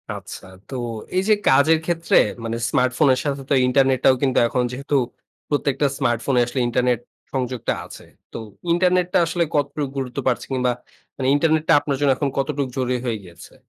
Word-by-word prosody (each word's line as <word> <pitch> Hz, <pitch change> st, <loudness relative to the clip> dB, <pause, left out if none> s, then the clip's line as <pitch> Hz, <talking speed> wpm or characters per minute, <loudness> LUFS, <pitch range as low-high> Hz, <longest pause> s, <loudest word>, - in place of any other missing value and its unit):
আচ্ছা। -, -, -9 dB, 0.2 s
তো 135 Hz, -, -6 dB, 0.4 s
এই 185 Hz, -, +2 dB
যে -, -, +7 dB
কাজের 140 Hz, +4 st, +5 dB
ক্ষেত্রে 165 Hz, -1 st, 0 dB, 0.3 s
মানে 115 Hz, 0 st, -3 dB
স্মার্টফোনের 130 Hz, +1 st, +2 dB
সাথে 140 Hz, -1 st, -2 dB
তো -, -, +2 dB
ইন্টারনেটটাও 130 Hz, 0 st, +3 dB
কিন্তু 130 Hz, -2 st, +1 dB
এখন 125 Hz, +1 st, 0 dB
যেহেতু 140 Hz, +3 st, -3 dB, 0.5 s
প্রত্যেকটা 145 Hz, -1 st, +1 dB
স্মার্টফোনে 125 Hz, 0 st, +1 dB
আসলে 125 Hz, +2 st, -4 dB
ইন্টারনেট 125 Hz, 0 st, +1 dB, 0.3 s
সংযোগটা 125 Hz, -3 st, -2 dB
আছে। -, -, -12 dB, 0.3 s
তো -, -, -7 dB, 0.3 s
ইন্টারনেটটা 180 Hz, 0 st, +2 dB
আসলে 170 Hz, +1 st, 0 dB
কতটুকু 145 Hz, 0 st, -1 dB
গুরুত্ব 130 Hz, -2 st, -4 dB
পাচ্ছে 125 Hz, -, 0 dB
কিংবা 125 Hz, -1 st, +1 dB, 0.5 s
মানে 130 Hz, -, -1 dB
ইন্টারনেটটা 160 Hz, +1 st, +2 dB
আপনার 140 Hz, -2 st, -2 dB
জন্য 140 Hz, -, +4 dB, 0.3 s
কতটুকু 140 Hz, -1 st, -1 dB
জরুরী 125 Hz, -1 st, 0 dB
হয়ে 115 Hz, -3 st, -1 dB
গিয়েছে? 85 Hz, -2 st, -14 dB
135 Hz, 155 wpm, -21 LUFS, 125-150 Hz, 0.5 s, যে